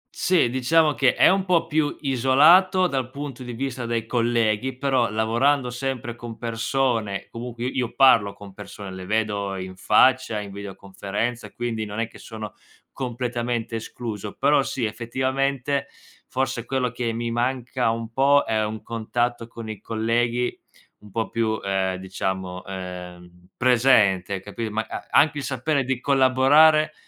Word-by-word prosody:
Sì, 180 -8 +3
diciamo 150 +4 +3
che 130 -2 +2
è - - +6
un 190 0 +2
po' 180 -3 +2
più 155 -2 0
isolato 150 +8 +5
dal 135 -7 -1
punto 140 -1 -7
di 125 -1 -6
vista 125 -1 -4
dei 115 -1 -1
colleghi, 120 +1 0
però, 130 -3 +1
lavorando 125 +5 +1
sempre 120 -2 -4
con 120 -1 -9
persone 115 -3 -1
comunque 120 0 -6
i 130 - -3
io 120 -2 -1
parlo 115 -7 +5
con 100 -1 -12
persone, 100 0 -9
le 95 0 -8
vedo 105 -2 -1
in 95 0 -6
faccia, 115 +3 +3
in 100 -1 -7
videoconferenza, 100 +4 -5
e - - -21
quindi 115 -2 -3
non 105 +1 -6
è 115 - 0
che - - -16
sono 110 -1 -8 0.4
completamente 120 -2 -3
escluso. 110 -2 -6
Però 140 +1 +3
sì, 135 -2 -2
effettivamente, 130 +4 -1 0.4
forse 130 -2 -2
quello 125 -1 -1
che 120 -1 -2
mi 115 +1 -3
manca 125 0 -1
un 115 0 -3
po' 140 +3 +4
è 110 -1 0
un 110 0 -4
contatto 115 +1 -2
con 115 -1 -9
i 110 -2 -7
colleghi 120 +2 0 0.4
un 105 - -15
po' 110 +3 -2
più, 110 -2 -1
ehm, 95 -1 0
diciamo, 95 0 -4
ehm, 90 -1 -9
presente, 105 -7 +3
capi 110 +2 -5
ma 110 +1 -2
a - - -7
anche 150 0 +3
il 140 - -5
sapere 140 +2 0
di 130 -1 -2
collaborare 145 +4 +4
120 Hz, 155 wpm, -24 LUFS, 110-130 Hz, 0.4 s, è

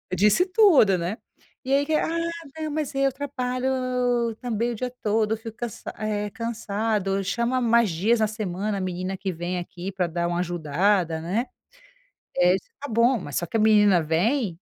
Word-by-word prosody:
disse 210 - +4
tudo, 365 - +5
né, 180 +6 -3 0.5
e 265 - 0
aí 280 +1 +4
que, 315 - 0
"Ah, - - +1 0.5
não, 310 -1 -3
mas 300 -2 -2
eu 275 0 +2
trabalho, 255 -2 -3
la 265 0 0
la 255 0 -2 0.3
la - - 0
la 225 - -6
também 235 -1 -2
o - - -4
dia 250 +3 -3
todo, 215 +1 +1
fico 225 0 -9
cansa 240 -2 -6
eh, 210 -1 -2
cansado, 215 -3 -2
chama 235 +6 0
mais 235 -2 +3
dias 205 +8 +1
na 215 - +3
semana 205 -1 -3
a - - -3
menina 185 +1 -3
que 190 0 -3
vem 175 +2 -3
aqui, 180 +2 -6
pra 190 -1 -1
dar 170 +1 -2
uma 175 0 -1
ajudada, 175 +1 +1
né," 200 +10 -1 0.9
é 180 0 +5
isso 190 - -10
tá 285 - -6
bom, 235 +3 +3
mas 145 -5 -6
só 175 - 0
que 225 - -3
a - - +2
menina 205 -5 +5
vem, 180 - 0
215 Hz, 195 wpm, -25 LUFS, 185-240 Hz, 0.9 s, tudo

